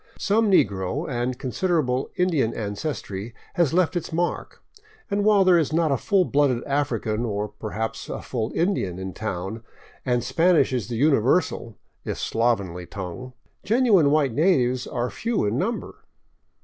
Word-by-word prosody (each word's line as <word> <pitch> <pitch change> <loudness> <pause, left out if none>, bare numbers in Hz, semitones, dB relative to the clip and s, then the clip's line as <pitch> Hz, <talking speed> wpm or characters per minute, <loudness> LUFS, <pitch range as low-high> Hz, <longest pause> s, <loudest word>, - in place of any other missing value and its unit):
Some 215 +1 +2
negro 105 - +1
and 125 -1 -2
considerable 135 -2 0
Indian 160 -11 +1
ancestry 105 -1 -5 0.2
has 170 -6 +2
left 180 +1 +2
its 175 - -3
mark, 175 +2 -3 0.5
and 200 0 +1
while 205 -2 +5
there 180 -2 +6
is 155 -3 0
not 160 -1 +2
a - - +3
full 190 - +2
blooded 140 -6 +1
African, 120 -6 -1
or 105 -2 -2
perhaps 110 +1 -5
a - - -4
full 115 -3 -3
Indian, 165 - 0
in 95 0 -5
town, 100 +3 -5 0.4
and 125 -2 0
Spanish 165 0 +3
is 120 -6 -1
the 120 - -4
universal, 135 - +2 0.3
if - - -4
slovenly, 100 -7 -1
tongue, 100 +7 -7 0.3
genuine 215 - +4
white 145 -4 +2
natives 130 -6 +2
are 125 0 -2
few 230 - -1
in 110 +5 0
number. 235 +8 -3
130 Hz, 150 wpm, -24 LUFS, 110-170 Hz, 0.5 s, there